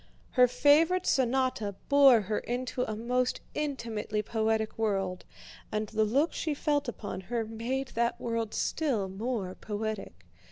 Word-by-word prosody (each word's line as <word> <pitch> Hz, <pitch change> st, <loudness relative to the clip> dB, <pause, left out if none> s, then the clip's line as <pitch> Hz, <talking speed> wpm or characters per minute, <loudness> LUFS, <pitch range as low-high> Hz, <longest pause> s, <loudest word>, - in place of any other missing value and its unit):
Her 250 Hz, -1 st, +6 dB
favorite 300 Hz, +8 st, +4 dB
sonata 255 Hz, -5 st, +1 dB
bore 275 Hz, -5 st, +7 dB
her 210 Hz, +2 st, -1 dB
into 250 Hz, +1 st, -3 dB
a 215 Hz, -, -4 dB
most 250 Hz, +3 st, 0 dB
intimately 230 Hz, -8 st, -2 dB
poetic 220 Hz, 0 st, 0 dB
world 195 Hz, -4 st, -1 dB, 0.5 s
and 215 Hz, 0 st, -1 dB
the 220 Hz, 0 st, +1 dB
look 275 Hz, +10 st, +2 dB
she 310 Hz, -3 st, -2 dB
felt 290 Hz, -1 st, 0 dB
upon 210 Hz, -5 st, -5 dB
her 225 Hz, +4 st, -2 dB
made 240 Hz, +4 st, -3 dB
that 235 Hz, +1 st, 0 dB
world 230 Hz, -2 st, -2 dB
still 255 Hz, -11 st, 0 dB
more 195 Hz, -1 st, -3 dB
poetic. 215 Hz, 0 st, -5 dB
230 Hz, 135 wpm, -29 LUFS, 215-265 Hz, 0.5 s, bore